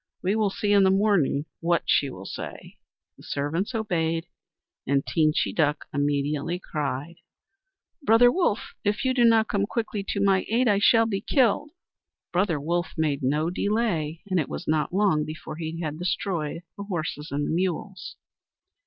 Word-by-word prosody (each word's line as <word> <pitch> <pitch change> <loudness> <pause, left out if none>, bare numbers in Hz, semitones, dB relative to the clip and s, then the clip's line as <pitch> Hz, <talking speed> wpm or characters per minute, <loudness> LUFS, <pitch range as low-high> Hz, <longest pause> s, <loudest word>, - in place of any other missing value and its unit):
We 190 +3 +1
will 215 -2 +2
see 205 +1 -1
in 200 -1 +6
the 190 - +5
morning 190 -8 +2
what 170 0 +1
she 140 - +2
will 95 -6 -9
say." - - -8 0.4
The - - -16
servants 165 - -2
obeyed, 165 -6 -1 0.6
and 140 +1 +1
Teenchy 155 -2 +1
Duck 150 -2 +1
immediately 145 +3 0
cried: 150 -1 -4 0.8
"Brother 245 -2 +6
Wolf, 340 - 0
if 205 +5 0
you 260 - +2
do 250 -2 +3
not 225 -1 +5
come 200 0 0
quickly 220 -3 -3
to - - -2
my 195 -1 +3
aid 240 +3 +2
I 205 -2 +3
shall 225 +2 +5
be 200 -3 -2
killed." 265 +4 +2 0.6
Brother 175 -4 +1
Wolf 170 +4 -2
made 150 -3 0
no 150 +5 +1
delay, 180 -7 -1
and 185 -2 +1
it 150 - -2
was - - -6
not 155 0 +1
long 185 -5 +2
before 155 0 -7
he 165 0 -5
had 155 -1 -4
destroyed 170 -2 -2
the 200 - -6
horses 160 -5 -4
and 145 +1 -1
the - - -2
mules. 185 +3 -3
175 Hz, 165 wpm, -26 LUFS, 155-205 Hz, 0.8 s, in